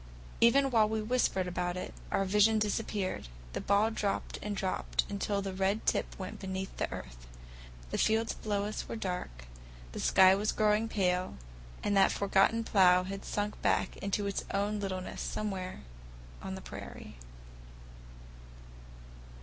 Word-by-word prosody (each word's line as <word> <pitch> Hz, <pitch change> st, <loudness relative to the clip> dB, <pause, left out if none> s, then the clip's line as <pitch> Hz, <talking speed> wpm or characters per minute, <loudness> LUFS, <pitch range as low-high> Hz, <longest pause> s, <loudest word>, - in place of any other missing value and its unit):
Even 270 Hz, +4 st, +5 dB
while 220 Hz, -3 st, +4 dB
we 220 Hz, 0 st, 0 dB
whispered 215 Hz, -4 st, +1 dB
about 180 Hz, 0 st, -2 dB
it, 180 Hz, -, -5 dB, 0.2 s
our 195 Hz, -, +1 dB
vision 210 Hz, +3 st, +4 dB
disappeared; 210 Hz, -, -1 dB, 0.3 s
the -, -, -3 dB
ball 205 Hz, +3 st, +3 dB
dropped 205 Hz, -3 st, -2 dB
and 210 Hz, -1 st, -3 dB
dropped 190 Hz, -1 st, -1 dB
until 200 Hz, 0 st, -1 dB
the 195 Hz, -1 st, -4 dB
red 195 Hz, +3 st, 0 dB
tip -, -, 0 dB
went 185 Hz, -1 st, -6 dB
beneath 190 Hz, 0 st, -4 dB
the -, -, -2 dB
earth. -, -, -8 dB, 0.6 s
The -, -, -1 dB
fields 220 Hz, +1 st, +2 dB
below 205 Hz, -2 st, -2 dB
us 210 Hz, -, -4 dB
were -, -, -3 dB
dark, 180 Hz, -, -4 dB, 0.5 s
the -, -, -6 dB
sky 190 Hz, 0 st, +6 dB
was 205 Hz, +2 st, 0 dB
growing 215 Hz, +1 st, +2 dB
pale, 180 Hz, -3 st, 0 dB, 0.5 s
and 205 Hz, -, +1 dB
that 195 Hz, -, +5 dB
forgotten 200 Hz, +3 st, +2 dB
plough 180 Hz, -4 st, +5 dB
had 195 Hz, +1 st, -6 dB
sunk 205 Hz, 0 st, -3 dB
back -, -, +1 dB, 0.2 s
to 205 Hz, -, +1 dB
its 200 Hz, -1 st, -2 dB
own 205 Hz, +1 st, 0 dB
littleness 185 Hz, -2 st, -4 dB
somewhere 190 Hz, -3 st, -4 dB, 0.6 s
on -, -, -5 dB
the -, -, -7 dB
prairie. -, -, -9 dB
200 Hz, 150 wpm, -31 LUFS, 185-215 Hz, 0.6 s, sky